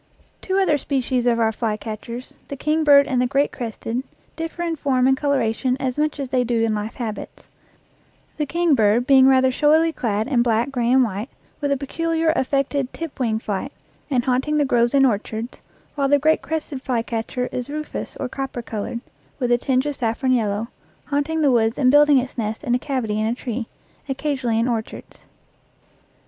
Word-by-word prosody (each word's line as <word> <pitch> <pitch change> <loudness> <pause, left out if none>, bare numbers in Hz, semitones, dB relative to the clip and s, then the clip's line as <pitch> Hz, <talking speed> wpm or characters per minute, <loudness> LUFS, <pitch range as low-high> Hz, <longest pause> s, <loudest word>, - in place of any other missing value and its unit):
Two 380 0 -1
other 340 -7 +3
species 255 -3 -1
of 235 -1 +3
our 225 -1 +3
flycatchers, 225 +2 -5
the 280 - -5
kingbird 295 -1 +4
and 255 -2 +1
the 250 - +2
great 275 +3 +1
crested, 230 0 -4 0.3
differ 330 +1 -4
in 335 -1 -1
form 265 -4 +1
and 265 0 +4
coloration 260 -2 0
as 255 -2 -2
much 300 -1 0
as 275 -2 -3
they 255 -1 +2
do 235 -1 0
in 225 -1 +1
life 215 +2 -4
habits 225 -4 -6 0.9
the 300 -1 -1
kingbird 250 -9 +2
being 265 -1 +6
rather 260 -1 +4
showily 315 +4 +3
clad 215 -5 -1
in 260 -4 +2
black, 235 +2 +1
gray, 245 -2 0
and 260 0 +5
white, 215 +2 -3 0.3
with 285 -1 -1
a 280 - +2
peculiar, 325 +3 0
affected, 275 -1 0
tip 330 -4 -7
wing 225 -4 +1
flight, 215 +4 -4 0.4
and 255 -4 +1
haunt 255 +2 +1
ing 300 0 +1
the 295 - +3
groves 240 0 +2
and 270 -1 +6
orchards, 225 0 -2 0.3
while 280 -2 0
the 285 - +5
great 310 +3 +2
crested 305 -4 -4
flycatcher 240 0 -2
is 250 +1 -4
rufous 305 +1 -5
or 265 - -2
copper 260 -2 -5
colored, 225 +2 -4 0.4
with 245 -3 -1
a 240 - +5
tinge 260 +1 +1
of 290 -1 -2
saffron 240 +2 -1
yellow, 220 -2 0 0.4
haunting 295 +3 -1
the 285 -3 +4
woods 225 -1 +2
and 255 -2 +4
building 295 0 +6
its 255 -1 -2
nest 220 +2 -3
in 245 -4 0
a 250 - +2
cavity 245 -7 -2
in 215 - 0
a 230 - 0
tree, 240 -2 -4 0.4
occasionally 265 -4 -1
in 230 +2 +1
or 230 -3 +1
chards. - - -13
255 Hz, 190 wpm, -22 LUFS, 235-285 Hz, 0.9 s, being